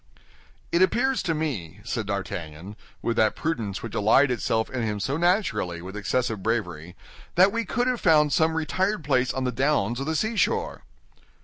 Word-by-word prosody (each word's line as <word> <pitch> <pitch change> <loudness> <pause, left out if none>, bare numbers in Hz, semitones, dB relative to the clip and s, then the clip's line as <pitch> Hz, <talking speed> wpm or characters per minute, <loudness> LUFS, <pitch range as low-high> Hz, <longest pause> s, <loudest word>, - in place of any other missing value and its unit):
"It 170 - +2
appears 250 +7 +2
to 165 -3 -1
me," 105 - -4
said 115 -2 -3
D'Artagnan, 95 -2 -5 0.3
with 115 -1 -1
that 110 -1 +3
prudence 115 -12 -3
which 115 - -6
allied 125 +6 +4
itself 110 -1 0
in 130 -2 -2
him 105 -2 -2
so 135 +7 -1
naturally 160 - 0
with 95 +3 -9
excessive 105 +1 -1
bravery, 90 -6 -3 0.4
"that 185 +3 +6
we 230 +1 -2
could 245 +5 0
have 250 -2 -1
found 150 -4 +4
some 160 +3 +2
retired 185 +4 -1
place 130 -3 +1
on 130 - -3
the 125 - 0
downs 125 -2 0
or - - -3
the 160 +1 -1
seashore." 235 - 0
130 Hz, 175 wpm, -25 LUFS, 105-165 Hz, 0.4 s, that